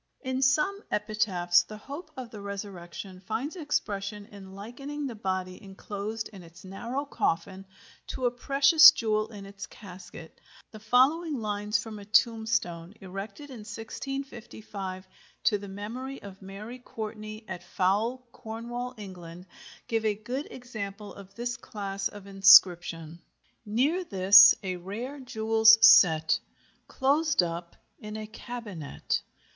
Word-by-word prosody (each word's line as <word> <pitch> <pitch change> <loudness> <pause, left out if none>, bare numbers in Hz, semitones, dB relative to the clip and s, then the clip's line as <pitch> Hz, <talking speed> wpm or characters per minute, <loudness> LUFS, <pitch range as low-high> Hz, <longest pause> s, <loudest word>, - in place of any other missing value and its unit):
In 260 0 -2
some 305 +10 +2
epitaphs 200 -5 +2
the 215 +4 -10
hope 285 +8 -9
of 250 -3 -7
the 210 - -9
resurrection 195 -2 -7
finds 225 - -4
expression 210 - -3
in 195 -3 -12
likening 275 +8 -6
the 260 - -4
body 185 -3 -4
enclosed 205 +2 -6
in 195 -4 -12
its 170 +1 -15
narrow 235 +9 -4
coffin 190 - -2 0.4
to 255 - -3
a 245 - +3
precious 275 +5 +7
jewel 215 -1 0
in 205 -3 -10
its 200 +1 -9
casket. 180 -4 -12 0.3
The 215 - -10
following 275 +9 +3
lines 210 -1 -1
from 215 0 -7
a 200 - -11
tombstone 215 -5 +1
erected 200 +9 -8
in 250 - -9
1655 220 -4 -7 0.4
to 210 -3 +3
the 200 - -9
memory 230 +8 -6
of 195 -1 -11
Mary 205 +6 -9
Courtney, 215 -2 -7
at 185 -2 -6
Fowell, 215 +8 0
Cornwall, 240 +3 -6
England, 180 -3 -10 0.4
give 225 -1 0
a 215 -1 +1
good 245 +8 -5
example 210 -5 -7
of 195 0 -13
this 240 +1 -3
class 200 -4 -4
of 205 -1 -12
inscription: 175 -4 +5 0.5
Near 280 - +1
this 195 - +8
a 185 -1 -3
rare 225 +11 -6
jewell's 220 -3 +5
set, 160 -6 +6 0.5
Clos'd 285 - +2
up 170 0 -5 0.2
in 210 0 -7
a 215 - -5
cabinet. 215 - -5
210 Hz, 130 wpm, -28 LUFS, 195-240 Hz, 0.5 s, this